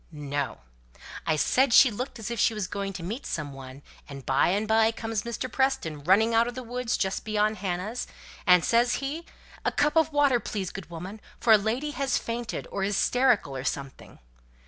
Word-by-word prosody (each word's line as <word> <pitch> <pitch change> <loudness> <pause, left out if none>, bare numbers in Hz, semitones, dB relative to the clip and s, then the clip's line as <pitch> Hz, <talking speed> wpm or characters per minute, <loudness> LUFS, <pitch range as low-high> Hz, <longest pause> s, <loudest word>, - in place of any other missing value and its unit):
"No: 145 -2 -4 0.7
I 160 - +3
said 255 - +2
she 260 - +8
looked 250 +6 -5
as 225 0 -5
if 235 - -3
she 225 - +3
was 210 -3 -2
going 195 +1 -4
to 185 - -7
meet 220 +10 -5
some 150 -3 -4
one, 135 +1 -11 0.3
and 140 -2 -9
by 135 0 +3
and 205 +4 0
by 220 +1 +4
comes 225 -1 -3
Mr. 235 +1 -4
Preston 245 - -1
running 210 +7 +4
out 230 +1 +4
of 240 - -5
the 255 - -5
wood 245 +1 -5
just 195 -4 0
beyond 215 0 0
Hannah's, 190 +5 -3 0.4
and 180 -2 +6
says 240 +1 +3
he, 295 +5 -4 0.4
'A - - 0
cup 295 +2 +2
of 320 -1 +3
water, 285 -4 +3
please, 195 -5 -4
good 185 -5 -9
woman, 185 +6 -8 0.2
for 225 - +5
a - - +8
lady 240 +8 -2
has 275 -2 0
fainted, 230 0 -4
or 195 - -2
is 200 0 0
'sterical 250 - +2
or 130 - -4
something.' 140 0 -5
220 Hz, 200 wpm, -27 LUFS, 180-245 Hz, 0.7 s, she